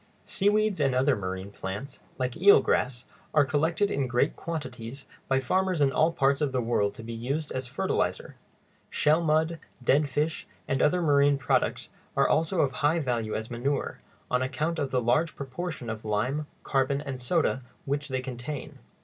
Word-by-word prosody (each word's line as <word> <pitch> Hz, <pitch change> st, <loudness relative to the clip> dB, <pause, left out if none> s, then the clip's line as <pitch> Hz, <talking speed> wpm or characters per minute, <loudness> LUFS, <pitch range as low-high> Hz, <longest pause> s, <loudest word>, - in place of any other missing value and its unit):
Seaweeds 210 Hz, -1 st, +2 dB
and 135 Hz, -3 st, +2 dB
other 135 Hz, +1 st, +3 dB
marine 95 Hz, 0 st, -5 dB
plants, 100 Hz, +8 st, -6 dB, 0.2 s
like 125 Hz, -1 st, -2 dB
eel 195 Hz, +5 st, +7 dB
grass, 125 Hz, -1 st, 0 dB, 0.3 s
are 150 Hz, -2 st, +6 dB
collected 160 Hz, +8 st, +1 dB
in 135 Hz, -2 st, 0 dB
great 125 Hz, +4 st, +1 dB
quantities 130 Hz, -5 st, -6 dB, 0.2 s
by 135 Hz, 0 st, +2 dB
farmers 185 Hz, +6 st, +1 dB
in 140 Hz, -2 st, +4 dB
all 155 Hz, +5 st, +3 dB
parts 140 Hz, -3 st, +2 dB
of 145 Hz, -2 st, +1 dB
the 130 Hz, -, 0 dB
world 115 Hz, -4 st, +1 dB
to 115 Hz, -, -9 dB
be 115 Hz, +1 st, -6 dB
used 140 Hz, +7 st, -3 dB
as 130 Hz, -1 st, -3 dB
a -, -, -16 dB
fertilizer. -, -, -1 dB, 0.5 s
Shell 155 Hz, +3 st, +3 dB
mud, 160 Hz, +1 st, +1 dB, 0.2 s
dead 140 Hz, +4 st, +3 dB
fish, 150 Hz, +4 st, -1 dB, 0.2 s
and 135 Hz, -, 0 dB
other 175 Hz, +3 st, +3 dB
marine 145 Hz, -2 st, +4 dB
products 135 Hz, -, 0 dB, 0.3 s
are -, -, +5 dB
also 165 Hz, +2 st, +2 dB
of 135 Hz, -, +2 dB
high 155 Hz, +2 st, +1 dB
value 120 Hz, -8 st, -1 dB
as 110 Hz, +3 st, -4 dB
manure, 135 Hz, +4 st, -2 dB, 0.3 s
on 125 Hz, 0 st, +2 dB
account 155 Hz, +6 st, -1 dB
of 140 Hz, -2 st, -1 dB
the 125 Hz, -2 st, 0 dB
large 150 Hz, +8 st, +2 dB
proportion 140 Hz, 0 st, -5 dB
of 110 Hz, -1 st, -5 dB
lime, 125 Hz, +8 st, -1 dB, 0.2 s
carbon, 135 Hz, 0 st, +1 dB
and 135 Hz, -3 st, -5 dB
soda 130 Hz, 0 st, +1 dB, 0.2 s
which 145 Hz, +2 st, -1 dB
they 130 Hz, -2 st, -2 dB
contain. 130 Hz, +2 st, -6 dB
140 Hz, 175 wpm, -28 LUFS, 125-155 Hz, 0.5 s, eel